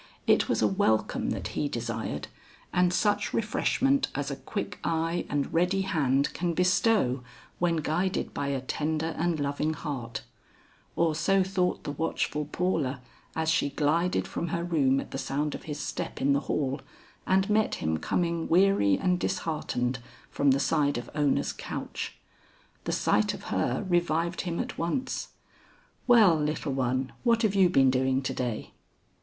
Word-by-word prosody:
It -, -, +3 dB
was -, -, +1 dB
a -, -, +5 dB
welcome 190 Hz, -, +1 dB
that -, -, -3 dB
he 145 Hz, -, -1 dB
desired, 115 Hz, -, -4 dB, 0.5 s
and 180 Hz, 0 st, +3 dB
such 205 Hz, +3 st, +1 dB
refreshment 270 Hz, +5 st, +1 dB
as 145 Hz, 0 st, -2 dB
a -, -, -2 dB
quick 200 Hz, +8 st, -5 dB
eye 165 Hz, +1 st, -1 dB
and 145 Hz, -1 st, -1 dB
ready 180 Hz, +3 st, +2 dB
hand 140 Hz, -8 st, +1 dB
can 170 Hz, -1 st, -1 dB
bestow 180 Hz, -, +2 dB, 0.4 s
when 170 Hz, -1 st, +2 dB
guided 170 Hz, +4 st, -1 dB
by 140 Hz, -, -2 dB
a 135 Hz, -2 st, -1 dB
tender 155 Hz, +4 st, -2 dB
and 170 Hz, -1 st, +1 dB
loving 145 Hz, +2 st, -1 dB
heart; 120 Hz, -9 st, -5 dB, 0.7 s
or 165 Hz, -1 st, +2 dB
so 190 Hz, +5 st, +2 dB
thought 185 Hz, -1 st, 0 dB
the -, -, -3 dB
watchful 150 Hz, 0 st, -1 dB
Paula 155 Hz, -8 st, 0 dB, 0.4 s
as 160 Hz, 0 st, +1 dB
she 150 Hz, -3 st, +2 dB
glided 155 Hz, +5 st, +1 dB
from 170 Hz, -, -3 dB
her 170 Hz, +1 st, -2 dB
room 140 Hz, -6 st, +2 dB
at -, -, -7 dB
the 135 Hz, -, -4 dB
sound 145 Hz, +2 st, -1 dB
of -, -, -7 dB
his 150 Hz, -1 st, -5 dB
step -, -, -4 dB
in 140 Hz, +1 st, +3 dB
the 140 Hz, -, +3 dB
hall, 135 Hz, -1 st, 0 dB, 0.5 s
and 190 Hz, +1 st, +3 dB
met 215 Hz, 0 st, +2 dB
him 80 Hz, 0 st, -1 dB
coming 170 Hz, -, -1 dB
weary 175 Hz, -, +4 dB
and 180 Hz, -1 st, +1 dB
disheartened 150 Hz, -9 st, -1 dB, 0.3 s
from 140 Hz, -, +2 dB
the 135 Hz, +1 st, +4 dB
side 145 Hz, 0 st, +1 dB
of 120 Hz, 0 st, -6 dB
Ona's 145 Hz, -2 st, +1 dB
couch. -, -, -5 dB, 0.7 s
The -, -, -1 dB
sight -, -, +2 dB
of -, -, -11 dB
her 125 Hz, +8 st, 0 dB
revived 175 Hz, -1 st, +1 dB
him 170 Hz, -2 st, -3 dB
at -, -, -4 dB
once. 170 Hz, +11 st, -2 dB, 0.8 s
"Well, 220 Hz, -8 st, +7 dB
little 150 Hz, -1 st, -1 dB
one, 130 Hz, 0 st, 0 dB
what 235 Hz, -1 st, +3 dB
have 210 Hz, -3 st, +2 dB
you 190 Hz, -3 st, +5 dB
been 135 Hz, -6 st, +5 dB
doing 130 Hz, +1 st, +1 dB
to -, -, -2 dB
day?" 120 Hz, -4 st, -3 dB
160 Hz, 160 wpm, -28 LUFS, 135-180 Hz, 0.8 s, Well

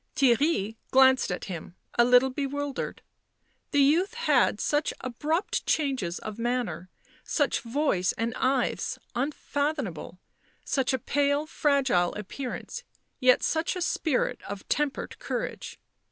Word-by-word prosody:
Theirry 245 Hz, -4 st, +2 dB
glanced 260 Hz, -4 st, +5 dB
at 180 Hz, -, -3 dB
him, 175 Hz, -2 st, -7 dB, 0.2 s
a 240 Hz, -, +5 dB
little 250 Hz, +2 st, +5 dB
bewildered; 285 Hz, +1 st, -3 dB, 0.7 s
the 285 Hz, -1 st, +4 dB
youth 350 Hz, +10 st, +3 dB
had 480 Hz, +1 st, +2 dB
such 295 Hz, +1 st, 0 dB
abrupt 305 Hz, -, -1 dB
changes 260 Hz, -, 0 dB
of 215 Hz, +1 st, -7 dB
manner, 230 Hz, -8 st, -2 dB, 0.3 s
such 290 Hz, -3 st, +1 dB
voice 230 Hz, -7 st, 0 dB
and 230 Hz, 0 st, -2 dB
eyes 260 Hz, 0 st, 0 dB, 0.2 s
unfathomable, 275 Hz, -, -2 dB, 0.5 s
such 265 Hz, -2 st, +1 dB
a 260 Hz, -, +1 dB
pale, 285 Hz, +3 st, +1 dB
fragile 275 Hz, -, +1 dB
appearance, 240 Hz, +6 st, -6 dB, 0.4 s
yet 255 Hz, 0 st, +5 dB
such 325 Hz, +3 st, 0 dB
a 360 Hz, -, -4 dB
spirit 315 Hz, -5 st, 0 dB
of 200 Hz, -1 st, -7 dB
tempered 295 Hz, -2 st, -2 dB
courage. -, -, -4 dB
265 Hz, 120 wpm, -27 LUFS, 230-290 Hz, 0.7 s, glanced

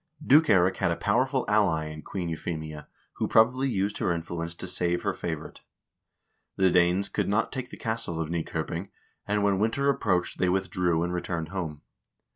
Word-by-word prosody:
Duke 150 Hz, +4 st, +6 dB
Eirik 95 Hz, -2 st, +4 dB
had -, -, +1 dB
a 85 Hz, -, +1 dB
powerful 130 Hz, +7 st, +1 dB
ally 100 Hz, -7 st, +2 dB
in 75 Hz, 0 st, -8 dB
Queen 90 Hz, +2 st, -4 dB
Euphemia, 80 Hz, -2 st, -5 dB, 0.3 s
who -, -, 0 dB
probably 125 Hz, +4 st, +4 dB
used 100 Hz, -2 st, -1 dB
her -, -, +1 dB
influence 85 Hz, 0 st, -4 dB
to -, -, -6 dB
save 90 Hz, 0 st, -1 dB
her 100 Hz, -2 st, 0 dB
favorite. 80 Hz, -5 st, -6 dB, 0.9 s
The 95 Hz, -1 st, +3 dB
Danes 90 Hz, +3 st, +3 dB
could -, -, -1 dB
not 105 Hz, +3 st, +1 dB
take 130 Hz, -2 st, -5 dB
the -, -, -10 dB
castle 110 Hz, -7 st, -3 dB
of 80 Hz, 0 st, -2 dB
Nykoping, 85 Hz, +2 st, -3 dB, 0.4 s
and 105 Hz, 0 st, +1 dB
when 100 Hz, -2 st, +2 dB
winter 115 Hz, +6 st, +1 dB
approached 95 Hz, -10 st, 0 dB
they 90 Hz, -, +2 dB
withdrew 90 Hz, -3 st, +1 dB
and 90 Hz, +1 st, -2 dB
returned 85 Hz, -2 st, -3 dB
home. 85 Hz, -6 st, -5 dB
90 Hz, 175 wpm, -27 LUFS, 85-105 Hz, 0.9 s, Duke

